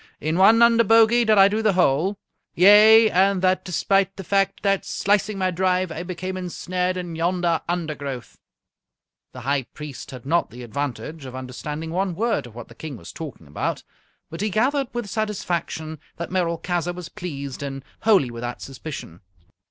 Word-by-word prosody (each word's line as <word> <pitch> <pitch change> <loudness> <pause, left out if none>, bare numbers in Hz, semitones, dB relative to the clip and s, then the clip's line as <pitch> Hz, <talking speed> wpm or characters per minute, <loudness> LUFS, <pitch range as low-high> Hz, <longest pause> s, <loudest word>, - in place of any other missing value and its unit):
In 155 +2 -1
one 225 +4 +7
under 230 0 +5
bogey 225 +2 +5
did 215 -1 +4
I 195 0 +8
do 210 +2 -1
the 215 -2 +2
hole 180 +3 +2 0.4
yea, 215 +4 +7
and 195 +1 +3
that 185 0 +2
despite 195 +2 +1
the 195 - -7
fact 195 +1 0
that, 195 -1 +2
slicing 205 +1 0
my 185 -1 0
drive, 185 0 0
I 160 - -5
became 185 +1 -5
ensnared 180 0 -2
in 175 -2 -5
yonder 170 0 0
undergrowth." 150 -7 -4 0.9
The 125 - -10
High 135 +2 0
Priest 150 -3 -8
had 130 -2 -10
not 170 +5 +1
the 125 +2 -10
advantage 140 +4 -5
of 130 -1 -8
understanding 150 +5 -6
one 185 0 -1
word 225 - -1
of 115 - -16
what 120 - -8
the - - -14
King 155 -5 -8
was 85 -3 -11
talking 150 - -8
about, 75 +1 -3 0.5
but 165 +3 -6
he 210 - 0
gathered 265 +7 +1
with 240 -3 -4
satisfaction 175 -7 -3 0.2
that 170 - -5
Merolchazzar 175 -1 -1
was 180 -2 -7
pleased 140 -6 -6
and 135 -1 -6
wholly 195 - +3
without 120 +1 -5
suspicion. 135 - -8
175 Hz, 170 wpm, -23 LUFS, 145-195 Hz, 0.9 s, I